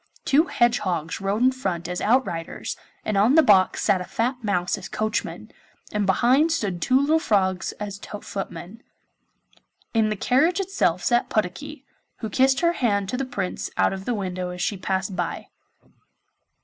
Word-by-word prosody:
Two 300 +4 +4
hedgehogs 185 - 0
rode 200 +4 0
in 260 - +5
front 190 -10 -3
as 180 0 -4
outriders, 215 -9 -1 0.3
and 215 -2 0
on 220 +8 +4
the 320 - +7
box 190 -6 +4
sat 185 - +2
a - - -2
fat 245 +6 -2
mouse 180 -4 0
as - - -9
coachman, 215 0 -3 0.4
and 210 -2 -1
behind 255 - +3
stood 195 - -2
two 255 +7 +3
little 305 +3 +3
frogs 190 - +1
as 200 -1 -6
footmen. 200 0 -7 1.1
In 220 -2 +3
the 215 - -1
carriage 290 - +2
itself 355 - 0
sat 240 0 +2
Puddocky, 260 +9 -3 0.3
who 220 -3 -5
kissed 265 +4 +3
her 340 0 +3
hand 200 - 0
to 250 - -2
the 270 - -2
Prince 195 -7 -4
out - - +3
of 190 0 -7
the 245 - -1
window 185 -3 -3
as 180 0 -7
she 180 +3 -1
passed 190 +1 -2
by. 175 -2 -4
210 Hz, 165 wpm, -24 LUFS, 185-255 Hz, 1.1 s, the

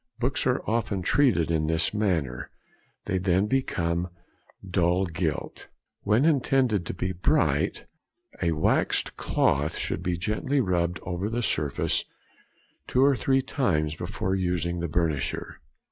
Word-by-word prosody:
Books 130 +1 0
are 125 +1 +1
often 110 -4 -1
treated 120 - +3
in 80 -2 +1
this 80 +3 0
manner, 85 - -1 0.6
they 95 - 0
then 95 +1 +2
become 90 -8 -1 0.6
"dull 90 +1 +2
gilt." 80 -3 -3 0.3
When 110 +7 +3
intended 130 - +2
to - - -4
be 95 +1 -2
bright, 90 0 +1 0.6
a 85 - +2
waxed 75 - +1
cloth 75 +3 +1
should - - -3
be 90 -1 -1
gently 110 +10 -1
rubbed 90 -6 0
over 90 +3 -3
the 120 +2 -2
surface 75 -8 0 0.8
two 130 +2 +3
or 140 -1 +4
three 135 +1 +1
times 75 - 0
before 90 +2 -3
using 90 -2 -1
the 85 - -2
burnisher. 80 -5 -1
90 Hz, 130 wpm, -26 LUFS, 85-115 Hz, 0.8 s, or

